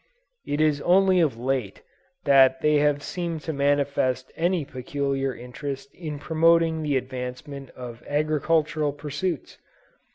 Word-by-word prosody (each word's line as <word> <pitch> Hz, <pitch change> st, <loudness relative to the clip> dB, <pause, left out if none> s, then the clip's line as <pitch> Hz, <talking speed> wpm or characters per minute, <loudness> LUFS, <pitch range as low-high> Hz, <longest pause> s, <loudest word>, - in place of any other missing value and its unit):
It 145 Hz, -, -1 dB
is 150 Hz, -2 st, +2 dB
only 185 Hz, +1 st, +4 dB
of 150 Hz, -9 st, +2 dB
late 125 Hz, -4 st, -2 dB, 0.4 s
that 135 Hz, -2 st, +5 dB
they 150 Hz, 0 st, +4 dB
have 145 Hz, 0 st, +2 dB
seemed 170 Hz, -4 st, -4 dB
to 160 Hz, -, -4 dB
manifest 140 Hz, -2 st, +1 dB
any 175 Hz, -2 st, 0 dB
peculiar 135 Hz, +1 st, -2 dB
interest 135 Hz, +3 st, -7 dB
in 155 Hz, -4 st, -6 dB
promoting 165 Hz, +1 st, +3 dB
the 145 Hz, -3 st, +1 dB
advancement 130 Hz, +2 st, -6 dB
of 120 Hz, -2 st, -8 dB
agricultural 155 Hz, 0 st, +1 dB
pursuits. 150 Hz, +5 st, -4 dB
145 Hz, 125 wpm, -25 LUFS, 135-160 Hz, 0.4 s, that